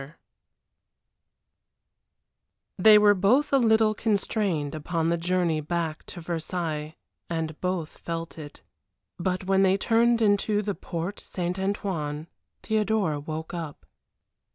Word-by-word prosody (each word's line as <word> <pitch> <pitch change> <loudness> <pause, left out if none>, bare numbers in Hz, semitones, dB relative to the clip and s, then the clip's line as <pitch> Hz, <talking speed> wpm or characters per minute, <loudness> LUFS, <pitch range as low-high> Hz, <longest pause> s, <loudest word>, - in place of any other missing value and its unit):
XI 135 - -9 2.7
They 215 +3 +8
were 210 0 +6
both 225 +11 +2
a 275 - +6
little 220 -2 +4
constrained 200 -8 -1
upon 160 +1 -1
the 170 - +1
journey 175 -2 +1
back 160 0 -3
to 175 - -8
Versailles 160 -2 -3 0.3
and 160 -2 -3
both 180 -4 -3
felt 165 -1 -5
it. 145 -2 -11 0.6
But 185 +1 -1
when 190 +1 +2
they 190 0 +4
turned 230 +3 +3
into 210 -1 +2
the 205 0 -1
Porte 175 +2 -5
St. 180 +1 -4
Antoine 170 -6 -2 0.4
Theodora 210 -8 0
woke 155 +3 -6
up. 160 - -6
180 Hz, 120 wpm, -26 LUFS, 160-205 Hz, 2.7 s, They